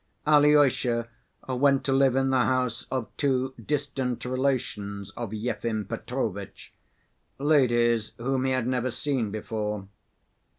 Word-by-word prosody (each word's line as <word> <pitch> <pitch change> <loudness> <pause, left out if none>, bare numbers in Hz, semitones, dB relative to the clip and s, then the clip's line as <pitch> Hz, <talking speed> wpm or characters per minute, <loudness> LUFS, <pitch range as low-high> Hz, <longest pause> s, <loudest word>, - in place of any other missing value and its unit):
Alyosha 145 -6 +4 0.4
went 135 +1 +2
to 135 - 0
live 135 -1 +4
in 135 0 +2
the 130 -2 +3
house 125 -3 0
of 130 -4 -4
two 130 -2 +1
distant 135 -3 -2
relations 120 -6 -2
of 120 -3 -5
Yefim 110 -1 -2
Petrovitch, 100 -7 -5 0.6
ladies 120 -6 +2
whom 130 +2 -1
he 130 - +1
had 130 -2 0
never 125 0 0
seen 130 -3 -1
before. 105 -1 -4
125 Hz, 120 wpm, -27 LUFS, 115-135 Hz, 0.6 s, Alyosha